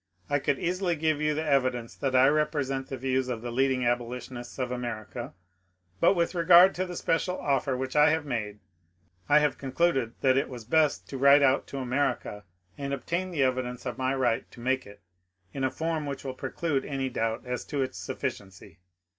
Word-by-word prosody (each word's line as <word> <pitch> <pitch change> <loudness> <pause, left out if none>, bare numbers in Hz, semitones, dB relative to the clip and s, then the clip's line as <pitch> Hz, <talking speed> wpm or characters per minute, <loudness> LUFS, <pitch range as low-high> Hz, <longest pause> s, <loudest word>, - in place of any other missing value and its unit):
I 145 - +3
could 140 0 0
easily 180 0 -1
give 155 -1 0
you 150 0 +1
the 155 +1 -2
evidence 130 -5 +1
that 135 -2 -2
I 130 +1 +6
represent 145 -3 0
the 135 - -5
views 130 0 0
of 120 -2 -4
the 120 - -4
leading 130 0 +1
abolitionists 120 0 -3
of 125 -2 -2
America; 120 +2 -5 0.6
but 195 - +4
with 170 0 0
regard 175 +2 +7
to 185 +1 -2
the 180 - -6
special 175 +2 0
offer 135 -2 0
which 130 +1 -4
I 150 +1 +6
have 155 -1 0
made, 110 -6 -3 0.7
I 145 - +6
have 150 -2 +2
concluded 135 -3 0
that 130 -1 +4
it 135 - 0
was 120 -4 -8
best 155 +4 +2
to 135 - -5
write 140 +1 +6
out 135 0 +3
to 140 - -7
America 130 -5 -2 0.3
and 140 0 -2
obtain 170 +8 -3
the 155 -6 0
evidence 125 -1 -1
of 125 -2 -4
my 130 +1 0
right 120 -4 0
to - - -15
make 130 +1 -1
it 100 - -14 0.5
in 135 - -3
a 130 - +2
form 160 0 -2
which 140 -1 -5
will 135 -2 -4
preclude 135 +2 -2
any 135 -2 -3
doubt 115 0 -2
as 125 0 -3
to 140 -3 -1
its 130 - -6
sufficiency. 105 -9 -6
135 Hz, 195 wpm, -28 LUFS, 125-150 Hz, 0.7 s, regard